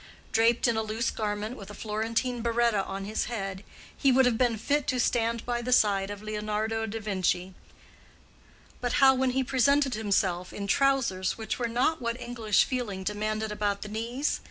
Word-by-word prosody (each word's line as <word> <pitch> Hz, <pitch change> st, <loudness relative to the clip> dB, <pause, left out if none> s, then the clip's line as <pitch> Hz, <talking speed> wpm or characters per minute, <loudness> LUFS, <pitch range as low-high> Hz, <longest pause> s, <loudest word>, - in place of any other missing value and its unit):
Draped 230 Hz, +2 st, +3 dB
in 235 Hz, -, +2 dB
a -, -, +2 dB
loose 220 Hz, +3 st, -1 dB
garment 210 Hz, +2 st, -3 dB
with 200 Hz, -4 st, -10 dB
a 205 Hz, -, -9 dB
Florentine 230 Hz, +3 st, -2 dB
berretta 235 Hz, -3 st, +2 dB
on 195 Hz, 0 st, -5 dB
his 215 Hz, +2 st, -1 dB
head, 195 Hz, -4 st, -4 dB, 0.3 s
he 275 Hz, -, +3 dB
would 260 Hz, +1 st, +5 dB
have 245 Hz, -2 st, +3 dB
been 235 Hz, -1 st, +1 dB
fit 285 Hz, +6 st, 0 dB
to 255 Hz, -, 0 dB
stand 230 Hz, -1 st, 0 dB
by 240 Hz, -1 st, -1 dB
the 250 Hz, +1 st, -3 dB
side 200 Hz, -5 st, +3 dB
of 205 Hz, 0 st, -7 dB
Leonardo 215 Hz, +1 st, -2 dB
de 225 Hz, +1 st, -4 dB
Vinci; 185 Hz, -3 st, -1 dB, 1.3 s
but 245 Hz, -1 st, -1 dB
how 270 Hz, -2 st, +6 dB
when 260 Hz, 0 st, +1 dB
he 260 Hz, +1 st, +1 dB
presented 270 Hz, +1 st, +2 dB
himself 195 Hz, -4 st, 0 dB
in 200 Hz, -, -5 dB
trousers 235 Hz, -5 st, +1 dB
which 220 Hz, +2 st, -4 dB
were 240 Hz, -, 0 dB
not 255 Hz, +6 st, +1 dB
what 235 Hz, +1 st, -2 dB
English 230 Hz, -4 st, +1 dB
feeling 225 Hz, -8 st, -3 dB
demanded 215 Hz, +2 st, -2 dB
about 205 Hz, -1 st, -1 dB
the 210 Hz, -, -7 dB
knees? 235 Hz, +7 st, -2 dB
225 Hz, 180 wpm, -28 LUFS, 210-245 Hz, 1.3 s, how